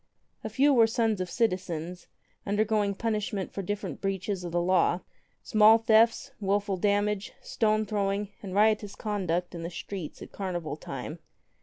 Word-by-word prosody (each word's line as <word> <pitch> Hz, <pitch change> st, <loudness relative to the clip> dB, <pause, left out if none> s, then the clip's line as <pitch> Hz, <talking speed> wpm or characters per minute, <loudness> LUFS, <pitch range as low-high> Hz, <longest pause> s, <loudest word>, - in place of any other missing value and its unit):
A -, -, -3 dB
few 285 Hz, +1 st, +4 dB
were 230 Hz, -3 st, +6 dB
sons 225 Hz, -3 st, 0 dB
of 180 Hz, -, -3 dB
citizens, 180 Hz, -6 st, -2 dB, 0.4 s
undergoing 205 Hz, 0 st, +1 dB
punishment 210 Hz, -3 st, -2 dB
for 200 Hz, -, -3 dB
different 205 Hz, +2 st, -4 dB
breaches 195 Hz, -1 st, -2 dB
of 175 Hz, -, -5 dB
the 175 Hz, -, +1 dB
law 180 Hz, 0 st, +2 dB, 0.2 s
— -, -, -43 dB
small 215 Hz, +1 st, +6 dB
thefts, 230 Hz, +4 st, +3 dB
wilful 200 Hz, 0 st, 0 dB
damage, 205 Hz, +1 st, 0 dB
stone 215 Hz, -1 st, +1 dB
throwing, 200 Hz, -1 st, -1 dB
and 195 Hz, -2 st, -6 dB
riotous 210 Hz, -1 st, +2 dB
conduct 180 Hz, -5 st, -2 dB
in 170 Hz, -, -6 dB
the 165 Hz, -, -4 dB
streets 180 Hz, -1 st, -7 dB
at -, -, -12 dB
carnival 175 Hz, -6 st, -4 dB
time. 150 Hz, +2 st, -7 dB
200 Hz, 155 wpm, -28 LUFS, 180-215 Hz, 0.4 s, were